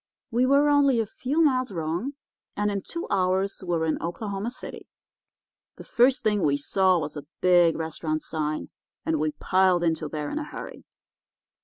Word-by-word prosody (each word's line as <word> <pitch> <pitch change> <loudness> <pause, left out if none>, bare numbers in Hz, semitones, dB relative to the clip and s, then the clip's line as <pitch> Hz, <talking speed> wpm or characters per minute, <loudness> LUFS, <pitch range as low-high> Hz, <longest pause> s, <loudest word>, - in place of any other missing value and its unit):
We 245 +2 +2
were 280 +2 +4
only 285 -4 +4
a 225 - +1
few 270 +9 0
miles 255 -5 +2
wrong, 170 - -3 0.4
and 205 0 +1
in 200 -1 -2
two 335 - -6
hours 190 0 +1
we 185 - -10
were 160 - 0
in 160 - -1
Oklahoma 200 +5 -3
City. 255 - -9 0.9
The - - -11
first 250 +2 +3
thing 210 -2 +2
we 145 -3 +2
saw 185 +5 +2
was 155 -2 -4
a 145 -1 -8
big 175 -2 +4
restaurant 155 -1 -3
sign, 155 -1 -3 0.4
and 160 -1 0
we 155 0 0
piled 185 +2 +2
into 160 -2 0
there 150 -1 -4
in 305 - -2
a - - -3
hurry. - - -9
185 Hz, 175 wpm, -26 LUFS, 160-245 Hz, 0.9 s, were